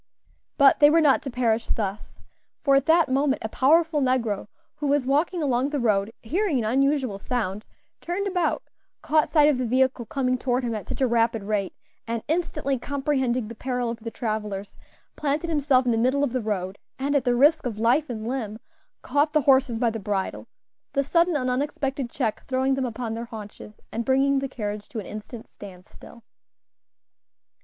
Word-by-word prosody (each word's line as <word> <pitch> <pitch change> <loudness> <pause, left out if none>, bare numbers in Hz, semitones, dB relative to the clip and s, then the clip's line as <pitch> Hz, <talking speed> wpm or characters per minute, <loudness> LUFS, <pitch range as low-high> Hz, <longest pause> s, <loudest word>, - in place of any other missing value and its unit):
But 280 -1 +6
they 290 - +8
were 330 +2 +5
not 295 -4 +4
to 275 - -5
perish 235 -3 0
thus; 205 -1 -4 0.5
for 280 -2 +3
at 275 -1 +2
that 330 0 +5
moment 270 +1 +1
a - - -2
powerful 310 +5 +3
negro, 240 -7 0 0.3
who 295 -1 -2
was 280 -2 +2
walking 310 +5 +1
along 260 -1 +1
the 290 -1 -2
road, 210 -3 +1
hearing 335 - 0
an 240 - 0
unusual 265 -2 +1
sound, 210 -3 -3 0.4
turned 360 +4 -2
about, 360 -4 0 0.4
caught 310 0 +2
sight 300 -2 +5
of 290 -4 +2
the 255 - 0
vehicle 255 -1 +1
coming 255 -4 0
toward 250 +1 0
him 235 -1 -2
at 215 - -5
such - - -5
a 260 - +4
rapid 230 -2 +1
rate, 200 -2 -2 0.3
and 230 -1 -3
instantly 300 -5 -1
comprehending 265 -4 -1
the 230 - -7
peril 245 0 -2
of 230 - -7
the 230 +1 -6
travellers, 210 -3 -4 0.4
planted 300 +3 -1
himself 280 -4 +3
in 245 - +2
the 225 - +1
middle 260 +4 +2
of 265 -4 -1
the 255 - 0
road, 195 -3 -3 0.2
and, 280 +2 -1
at 280 - +3
the 245 -1 +2
risk 295 +3 +4
of 225 -4 -5
life 250 +7 +2
and 220 -2 -5
limb, 230 -5 -3 0.5
caught 295 +2 +1
the 305 - +4
horses 265 -3 +3
by 230 -1 +1
the 225 - -5
bridle 200 -2 -3 0.5
the 275 - +2
sudden 335 +4 +2
and 255 -3 0
unexpected 270 0 -2
check 215 -2 -2
throwing 265 0 +1
them 265 -1 -1
upon 230 -1 -4
their 230 +1 -4
haunches, 210 -2 -10
and 230 - -2
bringing 270 +2 +2
the 270 0 -3
carriage 210 -4 -5
to - - -8
an 215 - -4
instant 215 +2 -8
stand 185 -3 -12
still. 235 - -15
255 Hz, 190 wpm, -25 LUFS, 225-285 Hz, 0.5 s, they